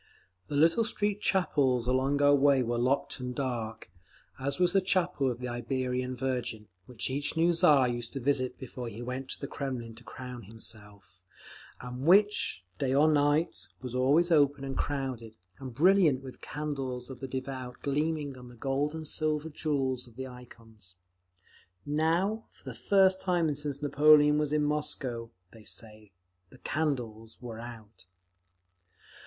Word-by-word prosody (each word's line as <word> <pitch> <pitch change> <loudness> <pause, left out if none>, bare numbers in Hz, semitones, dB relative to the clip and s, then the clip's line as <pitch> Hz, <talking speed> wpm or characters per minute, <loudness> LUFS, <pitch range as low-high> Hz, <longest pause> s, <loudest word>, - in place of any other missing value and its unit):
The - - -4
little 165 +10 +4
street 205 -2 -1
chapels 135 - +2
along 135 +3 +1
our 145 0 +6
way 140 -2 +4
were 120 0 -1
locked 130 +3 0
and 125 0 -5
dark, 115 -5 -4 0.5
as 140 +1 -2
was 180 -1 +3
the 195 - +4
Chapel 180 -7 +1
of 120 - -3
the 125 0 -5
Iberian 125 +1 -2
Virgin, 125 -4 -3 0.2
which 125 +1 -4
each 145 +4 -2
new 170 +2 +4
Tsar 145 -5 +5
used 120 -1 -4
to 135 - -3
visit 130 -1 0
before 125 -1 -7
he 115 +2 -8
went 130 +2 -5
to - - -5
the - - -4
Kremlin 130 -5 -5
to 115 +2 -13
crown 125 0 -8
himself, 105 -3 -7 0.6
and 125 0 -7
which, 205 - +4 0.2
day 135 -1 +1
or 150 +3 +5
night, 145 +3 +1 0.2
was 125 -2 -5
always 145 +7 +3
open 145 -3 +4
and 135 -1 -4
crowded, 130 -6 -3 0.2
and 130 -3 -8
brilliant 165 -4 +4
with 130 -1 -10
the - - -12
candles 135 -4 -4
of 130 - -9
the 135 - -5
devout 130 -1 -6
gleaming 145 0 -1
on 125 - -11
the 120 - -13
gold 140 +5 -1
and 160 -1 -5
silver 155 0 -1
and 150 - -18
jewels 135 -5 -1
of 115 - -18
the 130 +1 -5
ikons. 115 -6 -14 0.9
Now, 170 +9 +1
for - - -25
the 130 - -4
first 190 - +3
time 175 -5 +1
since 145 0 -2
Napoleon 150 +1 +6
was 150 -1 0
in 150 0 +2
Moscow, 130 -6 -2 0.2
they 110 -2 -15
say, 110 -1 -6 0.4
the - - -16
candles 120 -8 -3
were 115 -3 -7
out. 115 -4 -11
135 Hz, 165 wpm, -30 LUFS, 120-150 Hz, 0.9 s, our